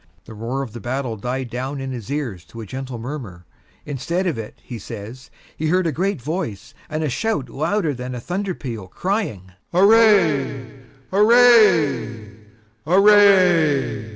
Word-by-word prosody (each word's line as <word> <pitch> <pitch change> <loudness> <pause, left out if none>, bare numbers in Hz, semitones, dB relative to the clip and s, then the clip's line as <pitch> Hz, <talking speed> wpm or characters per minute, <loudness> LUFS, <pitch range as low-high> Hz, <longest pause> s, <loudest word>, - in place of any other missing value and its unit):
The - - -11
roar 120 +5 -4
of 115 -6 -9
the 120 - -7
battle 125 0 -3
died 125 +3 -4
down 130 +3 -4
in 135 0 -5
his 120 -5 -7
ears 125 - -4
to 115 +9 -12
a 110 - -6
gentle 130 +3 -6
murmur; 115 - -7 0.4
instead 165 +6 -3
of 175 - 0
it, 115 -2 -8
he 120 -3 -8
says, 110 +6 -9 0.3
he 155 - -2
heard 180 +3 +2
a 165 - +1
great 185 +4 -1
voice 125 - -5 0.2
and 155 +1 -3
a - - 0
shout 220 - -2
louder 160 +2 -1
than 125 0 -6
a - - -5
thunder 185 +6 -3
peal 115 -8 -7
crying, 110 - -3 0.2
"Array, 185 - +4 0.5
array, 200 - +4 0.5
array!" 180 - +4
140 Hz, 155 wpm, -21 LUFS, 120-185 Hz, 0.5 s, Array